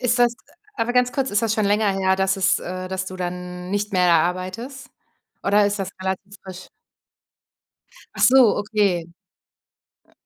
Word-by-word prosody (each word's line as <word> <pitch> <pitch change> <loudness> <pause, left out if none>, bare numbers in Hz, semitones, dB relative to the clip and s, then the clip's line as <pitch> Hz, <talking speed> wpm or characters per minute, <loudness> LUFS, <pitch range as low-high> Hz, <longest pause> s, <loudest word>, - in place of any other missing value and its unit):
Ist 245 -1 +1
das 240 -1 +3 0.4
aber 235 +2 -1
ganz 250 0 +2
kurz, 270 -1 -1
ist 205 +2 +1
das 225 -2 +1
schon 215 -2 0
länger 205 0 +2
her, 190 0 +1
dass 190 0 +1
es, 190 -1 +2
äh 185 +1 -6
dass 190 0 -4
du 185 - -7
dann 180 0 -6
nicht 205 +1 -2
mehr 180 -1 +3
da 165 -2 +5
arbeitest 185 - -5 0.5
oder 205 +1 +3
ist 205 0 -2
das 195 0 -4
relativ 190 +1 -4
frisch? 185 -1 -10 1.5
Ach - - -5
so, 255 -3 +6
okay. 205 -5 0 1.0
Äh. - - -29
195 Hz, 170 wpm, -22 LUFS, 185-220 Hz, 1.5 s, so